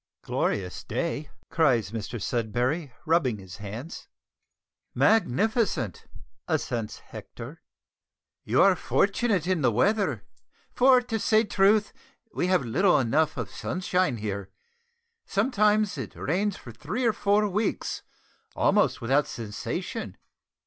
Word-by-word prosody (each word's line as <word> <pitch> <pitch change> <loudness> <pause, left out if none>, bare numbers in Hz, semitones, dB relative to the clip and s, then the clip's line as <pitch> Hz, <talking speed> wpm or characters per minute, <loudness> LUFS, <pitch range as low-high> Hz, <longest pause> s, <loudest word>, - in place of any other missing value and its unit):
"Glorious 90 -3 -2
day," 155 -3 -3 0.2
cries 120 - +2
Mr 115 +1 -5
Sudberry, 125 - -1
rubbing 155 -9 +2
his 95 -3 -11
hands. 110 - -8 0.9
"Magnificent," 200 - +1 0.4
assents 115 -4 -2
Hector. - - -10 0.8
"You 120 +5 +3
are 195 -1 +5
fortunate 200 -1 +1
in 185 -3 0
the 130 - +3
weather, 200 - +1 0.5
for, 255 0 +5
to 230 -2 -3
say 215 +1 +3
truth, 205 0 +3 0.4
we 180 - 0
have 180 -8 +2
little 175 - +3
enough 145 +6 +1
of 115 -4 -4
sunshine 180 -6 -1
here. 100 -2 -4 0.8
Sometimes 215 -4 +2
it 110 -8 -6
rains 195 +6 -1
for 120 - -11
three 160 - -3
or 230 - +3
four 205 +1 +2
weeks, 205 +2 -2 0.5
almost - - +2
without 135 +5 +2
cessation." 105 -3 -5
160 Hz, 115 wpm, -26 LUFS, -, 0.9 s, are